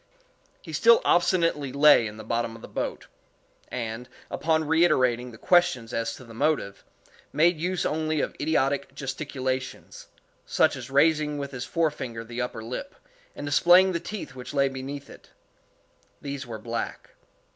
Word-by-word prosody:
He -, -, -9 dB
still 475 Hz, -1 st, +6 dB
obstinately 170 Hz, -6 st, +2 dB
lay 140 Hz, -5 st, +6 dB
in 105 Hz, 0 st, -9 dB
the 110 Hz, -, -8 dB
bottom 115 Hz, +1 st, -2 dB
of 115 Hz, -, -13 dB
the -, -, -8 dB
boat; -, -, -4 dB, 0.6 s
and, 120 Hz, 0 st, -5 dB, 0.2 s
upon 160 Hz, -1 st, 0 dB
reiterating 130 Hz, -7 st, +3 dB
the 115 Hz, -, -12 dB
questions 135 Hz, -8 st, +2 dB
as 115 Hz, 0 st, -2 dB
to -, -, -12 dB
the 115 Hz, -2 st, -13 dB
motive, 140 Hz, -6 st, -1 dB, 0.5 s
made 160 Hz, +2 st, +3 dB
use 180 Hz, +1 st, -1 dB
only 155 Hz, 0 st, 0 dB
of -, -, -2 dB
idiotic 140 Hz, -3 st, 0 dB
gesticulations, 130 Hz, -1 st, -4 dB, 0.4 s
such -, -, +2 dB
as 130 Hz, -1 st, -8 dB
raising 150 Hz, +1 st, +3 dB
with 140 Hz, -1 st, -5 dB
his 130 Hz, -2 st, -5 dB
forefinger 135 Hz, -8 st, -2 dB
the 120 Hz, +2 st, -5 dB
upper 125 Hz, -2 st, -4 dB
lip, 125 Hz, -, -6 dB, 0.4 s
and -, -, -6 dB
displaying 175 Hz, +6 st, +5 dB
the 170 Hz, -, -1 dB
teeth 185 Hz, -4 st, -7 dB
which 125 Hz, +2 st, -8 dB
lay 140 Hz, 0 st, +4 dB
beneath 135 Hz, +2 st, -7 dB
it. -, -, -15 dB, 0.9 s
These 140 Hz, -1 st, -6 dB
were 115 Hz, -2 st, -6 dB
black. 115 Hz, +2 st, -5 dB
140 Hz, 155 wpm, -26 LUFS, 120-160 Hz, 0.9 s, still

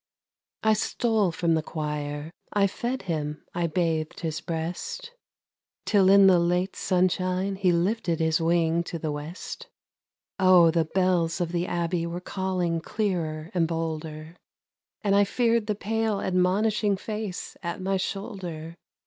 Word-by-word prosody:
I 220 Hz, 0 st, +5 dB
stole 215 Hz, -2 st, +1 dB
from 165 Hz, 0 st, +1 dB
the 160 Hz, -, +2 dB
choir; 150 Hz, -1 st, -4 dB, 0.2 s
I 205 Hz, -1 st, +3 dB
fed 240 Hz, +5 st, -2 dB
him, 150 Hz, -4 st, -3 dB
I 175 Hz, -1 st, 0 dB
bathed 160 Hz, -2 st, -1 dB
his 160 Hz, -2 st, -3 dB
breast, 175 Hz, -, -4 dB, 0.7 s
Till 195 Hz, -3 st, +4 dB
in 200 Hz, 0 st, +8 dB
late 180 Hz, 0 st, +3 dB
sunshine 185 Hz, +1 st, +1 dB
he 190 Hz, -2 st, +2 dB
lifted 175 Hz, 0 st, 0 dB
his 160 Hz, 0 st, +2 dB
wing 165 Hz, 0 st, +2 dB
to 170 Hz, -, -4 dB
the 155 Hz, -1 st, -3 dB
west. 150 Hz, +5 st, -7 dB, 0.7 s
Oh, 180 Hz, -3 st, +7 dB
the 165 Hz, -1 st, +2 dB
bells 180 Hz, -1 st, +1 dB
of 175 Hz, -2 st, -1 dB
the 175 Hz, 0 st, -1 dB
Abbey 170 Hz, 0 st, -1 dB
were 170 Hz, +1 st, -4 dB
calling 180 Hz, -3 st, -1 dB
clearer 165 Hz, -5 st, -2 dB
and 170 Hz, -3 st, +2 dB
bolder, 160 Hz, 0 st, -4 dB, 0.7 s
And 200 Hz, -1 st, +3 dB
I 205 Hz, -, +6 dB
feared 230 Hz, +1 st, +1 dB
the 210 Hz, -, 0 dB
pale 220 Hz, 0 st, -1 dB
admonishing 195 Hz, +3 st, +2 dB
face 210 Hz, -2 st, -5 dB
at 170 Hz, +3 st, -4 dB
my 190 Hz, +1 st, 0 dB
shoulder. 185 Hz, -5 st, -5 dB
180 Hz, 140 wpm, -26 LUFS, 165-195 Hz, 0.7 s, in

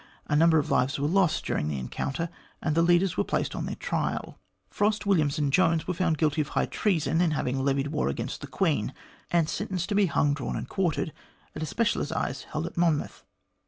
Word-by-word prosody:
A 150 Hz, -, 0 dB
number 160 Hz, +1 st, +5 dB
of 150 Hz, -, 0 dB
lives 130 Hz, +4 st, +2 dB
were 145 Hz, -, +1 dB
lost 180 Hz, 0 st, +2 dB
during 75 Hz, -, -1 dB
the 75 Hz, -2 st, -2 dB
encounter, 140 Hz, -, -3 dB, 0.3 s
and 155 Hz, -, -1 dB
the 165 Hz, -, +3 dB
leaders 175 Hz, +2 st, +3 dB
were -, -, +3 dB
placed -, -, -1 dB
on -, -, -3 dB
their -, -, -3 dB
trial. -, -, -3 dB, 0.3 s
Frost, 210 Hz, 0 st, +1 dB
Williams, 155 Hz, -8 st, +2 dB
and 145 Hz, -2 st, 0 dB
Jones 165 Hz, -3 st, +3 dB
were 180 Hz, -, 0 dB
found 170 Hz, -2 st, +1 dB
guilty 155 Hz, -1 st, +2 dB
of 145 Hz, -, -3 dB
high -, -, 0 dB
treason 170 Hz, -4 st, +1 dB
in 175 Hz, -, +3 dB
having 135 Hz, -3 st, -1 dB
levied 140 Hz, 0 st, +1 dB
war 145 Hz, -, 0 dB
against 70 Hz, -, -4 dB
the -, -, -6 dB
Queen, -, -, 0 dB, 0.3 s
and 170 Hz, -2 st, +2 dB
sentenced 185 Hz, -2 st, -3 dB
to -, -, 0 dB
be 200 Hz, -1 st, +4 dB
hanged, 145 Hz, -1 st, +1 dB
drawn, 135 Hz, -, -3 dB
and -, -, -4 dB
quartered 180 Hz, -3 st, -1 dB, 0.4 s
at 155 Hz, -, -5 dB
a 155 Hz, -, -2 dB
special 225 Hz, +9 st, +1 dB
assize 135 Hz, -1 st, -3 dB
held 155 Hz, +1 st, -3 dB
in 175 Hz, -, -6 dB
Monmouth. 165 Hz, -4 st, 0 dB
160 Hz, 215 wpm, -27 LUFS, 145-180 Hz, 0.4 s, number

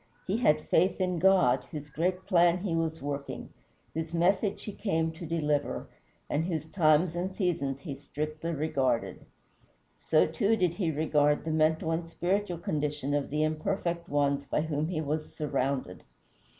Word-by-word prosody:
He 195 Hz, +4 st, 0 dB
had 155 Hz, -11 st, +2 dB
faith 185 Hz, +4 st, +3 dB
in 180 Hz, -2 st, 0 dB
God, 180 Hz, -9 st, +4 dB
whose 150 Hz, -1 st, -7 dB
great 180 Hz, +5 st, -1 dB
plan 175 Hz, -2 st, +4 dB
he 180 Hz, -2 st, -2 dB
was 160 Hz, -2 st, -1 dB
working, 140 Hz, -1 st, -4 dB, 0.4 s
whose 160 Hz, +1 st, -3 dB
message 190 Hz, +4 st, +1 dB
he 210 Hz, -, -5 dB
came 165 Hz, -6 st, -1 dB
to 160 Hz, +1 st, -8 dB
deliver, 150 Hz, -3 st, -1 dB, 0.4 s
and 150 Hz, -, 0 dB
whose 165 Hz, -3 st, -2 dB
times 160 Hz, 0 st, +3 dB
and 180 Hz, +2 st, -2 dB
seasons 160 Hz, -8 st, -1 dB
he 150 Hz, -, -5 dB
strictly 155 Hz, +3 st, -5 dB
regarded. 140 Hz, -6 st, -1 dB, 0.8 s
So, 155 Hz, -, +3 dB
too, 200 Hz, +8 st, +1 dB
did 180 Hz, -6 st, +2 dB
he 175 Hz, -3 st, -1 dB
regard 150 Hz, -1 st, +2 dB
the 160 Hz, -, -1 dB
mental 160 Hz, +1 st, +2 dB
and 165 Hz, +1 st, -2 dB
spiritual 180 Hz, +2 st, -1 dB
condition 150 Hz, -3 st, -2 dB
of 145 Hz, -1 st, 0 dB
the 150 Hz, +2 st, 0 dB
imperfect 170 Hz, +2 st, -1 dB
ones 140 Hz, -1 st, +1 dB
by 145 Hz, -, -1 dB
whom 155 Hz, -1 st, -1 dB
he 165 Hz, -3 st, -2 dB
was 155 Hz, +1 st, -3 dB
surrounded. 135 Hz, -8 st, -2 dB
160 Hz, 160 wpm, -29 LUFS, 150-175 Hz, 0.8 s, God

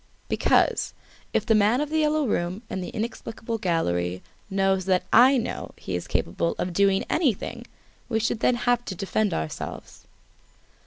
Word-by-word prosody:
"Because, -, -, +2 dB, 0.4 s
if -, -, 0 dB
the 225 Hz, -, +3 dB
man 215 Hz, +3 st, +4 dB
of 300 Hz, 0 st, -2 dB
"The 315 Hz, -, +2 dB
Yellow 305 Hz, -1 st, +2 dB
Room" 185 Hz, -1 st, -1 dB
and 185 Hz, -, -3 dB
the -, -, -5 dB
inexplicable 225 Hz, 0 st, -4 dB
gallery 90 Hz, -, -1 dB, 0.3 s
knows 195 Hz, -1 st, +1 dB
that 185 Hz, -1 st, +2 dB
I 260 Hz, +2 st, +7 dB
know, 240 Hz, -, -4 dB
he 95 Hz, -, -4 dB
is 90 Hz, -, -4 dB
capable 85 Hz, 0 st, -1 dB
of 180 Hz, -, -2 dB
doing 195 Hz, +1 st, +3 dB
anything! 275 Hz, -, -1 dB, 0.4 s
We 225 Hz, -2 st, +1 dB
should 225 Hz, 0 st, -1 dB
then 245 Hz, -, +3 dB
have 245 Hz, 0 st, +1 dB
to 190 Hz, -, -5 dB
defend 200 Hz, +3 st, 0 dB
ourselves." 80 Hz, -, -5 dB
205 Hz, 160 wpm, -25 LUFS, 180-240 Hz, 0.4 s, I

